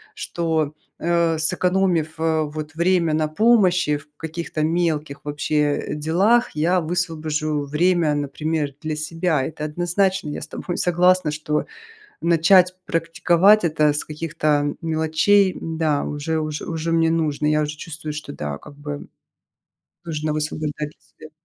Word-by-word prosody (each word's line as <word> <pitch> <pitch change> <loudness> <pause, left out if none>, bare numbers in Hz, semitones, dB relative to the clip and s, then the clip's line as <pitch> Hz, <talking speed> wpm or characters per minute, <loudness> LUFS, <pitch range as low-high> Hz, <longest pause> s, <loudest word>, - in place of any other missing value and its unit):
что, 160 -3 -1 0.3
э, 170 -1 +1
сэкономив, 180 -1 +1
э, 160 -1 +1
вот 155 +1 -6
время 170 -1 +2
на 155 0 +1
помощи 180 -4 +3
в 145 +1 -15
каких-то 160 -1 -4
мелких 155 -3 -1
вообще 150 0 0
делах, 185 +11 +2
я 175 +4 +2
высвобожу 155 -3 -2
время, 160 +1 +2
например, 145 +1 -2
для 155 -1 -3
себя. 160 -1 -1
Это 155 -1 -5
однозначно 175 +2 0
я 145 - -5
с - - -7
тобой 175 - -5
согласна, 180 -1 +3
что 150 0 -2 0.6
начать 170 +2 +5
практиковать 170 +5 +3
это 155 -2 +3
с 150 - -3
каких-то 155 -2 -1
мелочей, 165 +5 +2
да, 160 -3 0
уже 150 +2 -2
уж 155 -1 -3
уже 165 0 -3
мне 165 0 +3
нужно, 155 -3 0
я 150 0 +2
уже 150 0 -4
чувствую, 155 0 -7
что 150 -1 -7
да, 75 - -4
как 150 - -13
бы 145 0 -6 1.0
нужно 155 -2 -2
высвобождать 150 0 -3
свет. 155 0 -16
160 Hz, 135 wpm, -22 LUFS, 150-170 Hz, 1.0 s, начать